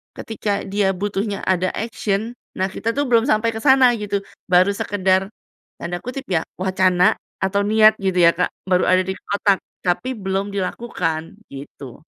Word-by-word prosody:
ketika 210 Hz, -2 st, -3 dB
dia 195 Hz, -1 st, 0 dB
butuhnya 200 Hz, +1 st, -3 dB
ada 185 Hz, 0 st, +1 dB
action, 220 Hz, 0 st, -2 dB, 0.2 s
nah 190 Hz, +1 st, 0 dB
kita 230 Hz, +4 st, -3 dB
tuh 285 Hz, -, +1 dB
belum 230 Hz, +1 st, +3 dB
sampai 230 Hz, -3 st, +2 dB
ke 220 Hz, -, -6 dB
sana 265 Hz, -2 st, +6 dB
gitu, 200 Hz, -1 st, -2 dB, 0.2 s
baru 185 Hz, +2 st, +4 dB
sekedar, 190 Hz, -1 st, 0 dB, 0.5 s
tanda 175 Hz, +1 st, -4 dB
kutip 255 Hz, +2 st, -5 dB
ya, 160 Hz, -, +2 dB, 0.2 s
"wacana", 185 Hz, -1 st, +3 dB, 0.3 s
atau 200 Hz, +1 st, +1 dB
"niat" 215 Hz, 0 st, +6 dB
gitu 190 Hz, -2 st, -1 dB
ya 170 Hz, -, +7 dB
Kak, 180 Hz, -, +2 dB, 0.2 s
baru 180 Hz, 0 st, +3 dB
ada 185 Hz, 0 st, +4 dB
di 190 Hz, -, -3 dB, 0.2 s
otak, 200 Hz, -1 st, +2 dB, 0.2 s
tapi 180 Hz, +8 st, 0 dB
belum 195 Hz, -2 st, -2 dB
dilakukan, 180 Hz, -5 st, -2 dB, 0.3 s
gitu. 140 Hz, 0 st, -10 dB
195 Hz, 160 wpm, -20 LUFS, 185-215 Hz, 0.5 s, ya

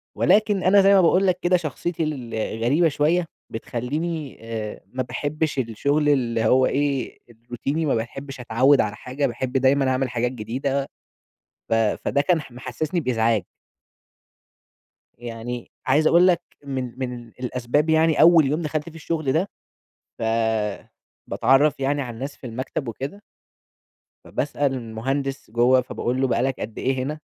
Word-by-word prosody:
ولكن 210 Hz, -2 st, +3 dB
أنا 200 Hz, +2 st, +6 dB
زي 195 Hz, +1 st, +5 dB
ما 195 Hz, -, +6 dB
باقول 185 Hz, +3 st, +4 dB
لك 180 Hz, -1 st, +1 dB
كده 180 Hz, +1 st, +3 dB
شخصيتي 165 Hz, +1 st, -3 dB
الغريبة 125 Hz, +2 st, 0 dB
شوية، 160 Hz, +4 st, +1 dB, 0.2 s
بتخليني، 145 Hz, +7 st, -4 dB
آآ، 110 Hz, -2 st, -5 dB
ما 130 Hz, 0 st, -1 dB
باحبش 145 Hz, +3 st, -2 dB
الشغل 140 Hz, +6 st, +1 dB
اللي 115 Hz, -5 st, +1 dB
هو 130 Hz, +3 st, +5 dB
إيه، 140 Hz, -2 st, -1 dB
الروتيني 120 Hz, +7 st, -4 dB
وما 145 Hz, -, +2 dB
باحبش 135 Hz, +4 st, -5 dB
أتعوِّد 125 Hz, +4 st, +4 dB
على 105 Hz, -1 st, -2 dB
حاجة، 135 Hz, +5 st, -2 dB
باحب 125 Hz, +1 st, -4 dB
دايمًا 135 Hz, +1 st, +3 dB
أعمل 130 Hz, 0 st, 0 dB
حاجات 120 Hz, 0 st, -1 dB
جديدة، 135 Hz, +4 st, -2 dB, 0.8 s
ف -, -, +1 dB
فده 115 Hz, +5 st, +1 dB
كان 165 Hz, +2 st, +2 dB
ح 140 Hz, -, -13 dB
محسسني 135 Hz, +7 st, -3 dB
بإزعاج. 115 Hz, -, +1 dB, 1.7 s
يعني، 120 Hz, 0 st, -6 dB, 0.2 s
عايز 150 Hz, +4 st, +4 dB
أقول 175 Hz, +2 st, +6 dB
لك 175 Hz, -2 st, +3 dB, 0.2 s
من 130 Hz, -3 st, -5 dB
من 125 Hz, -2 st, -5 dB
الأسباب 125 Hz, +5 st, -1 dB
يعني 160 Hz, 0 st, +4 dB
أول 165 Hz, -2 st, +7 dB
يوم 150 Hz, +5 st, 0 dB
دخلت 155 Hz, 0 st, -3 dB
فيه 165 Hz, -, -16 dB
الشغل 155 Hz, -3 st, -2 dB
ده، 180 Hz, +7 st, +1 dB, 0.7 s
ف -, -, -8 dB, 1.1 s
باتعرّف 140 Hz, +3 st, +3 dB
يعني 140 Hz, +1 st, 0 dB
على 125 Hz, -3 st, -5 dB
الناس 135 Hz, +4 st, -6 dB
في 130 Hz, -, -9 dB
المكتب، 130 Hz, +3 st, -4 dB
وكده 135 Hz, -, -6 dB, 1.0 s
فباسأل 140 Hz, +1 st, -1 dB
المهندس 130 Hz, +2 st, -3 dB
جوّه، 125 Hz, +3 st, +4 dB
فباقول 125 Hz, +1 st, -2 dB
له: 135 Hz, -, +3 dB
"بقى 120 Hz, -, +1 dB
لك 135 Hz, 0 st, -1 dB
قد 110 Hz, 0 st, -6 dB
إيه 130 Hz, 0 st, 0 dB
هنا؟" 150 Hz, +3 st, -4 dB
135 Hz, 145 wpm, -23 LUFS, 120-155 Hz, 1.7 s, أول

